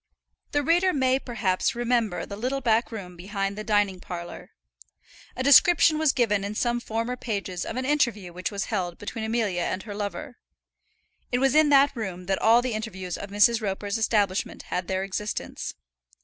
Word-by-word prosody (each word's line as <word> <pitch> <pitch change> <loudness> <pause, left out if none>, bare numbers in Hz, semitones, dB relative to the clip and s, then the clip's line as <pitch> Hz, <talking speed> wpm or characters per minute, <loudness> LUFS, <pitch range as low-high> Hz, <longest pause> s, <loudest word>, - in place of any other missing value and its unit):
The 290 0 +1
reader 350 +5 +3
may, 260 -1 +2
perhaps, 225 -8 -1
remember 235 -5 0
the 200 - -7
little 255 +6 -2
back 230 -2 +1
room 185 -5 -7
behind 195 +2 -3
the 215 - -5
dining 205 -3 +1
parlour. 175 -1 -8 0.9
A 255 - -2
description 310 +3 +6
was 315 -3 +4
given 215 -6 +1
in 205 +1 -4
some 240 +1 0
former 230 +1 -3
pages 200 -7 -4
of - - -5
an 255 +1 -2
interview 240 -11 0
which 180 +1 -3
was 200 -1 -3
held 180 -5 -3
between 220 +2 -6
Amelia 220 -5 0
and 185 +2 -2
her 210 - -7
lover. 210 +6 -5 0.9
It 245 - +2
was 270 +1 +2
in 310 0 +5
that 280 0 +5
room 190 -6 -5
that 190 +1 -1
all 230 +2 +5
the 250 -2 -2
interviews 190 -5 -4
of 200 - -7
Mrs. 210 +3 +4
Roper's 200 +1 -2
establishment 205 -4 0
had 180 -1 -2
their 190 0 -1
existence. 205 +2 -4
220 Hz, 175 wpm, -26 LUFS, 195-250 Hz, 0.9 s, description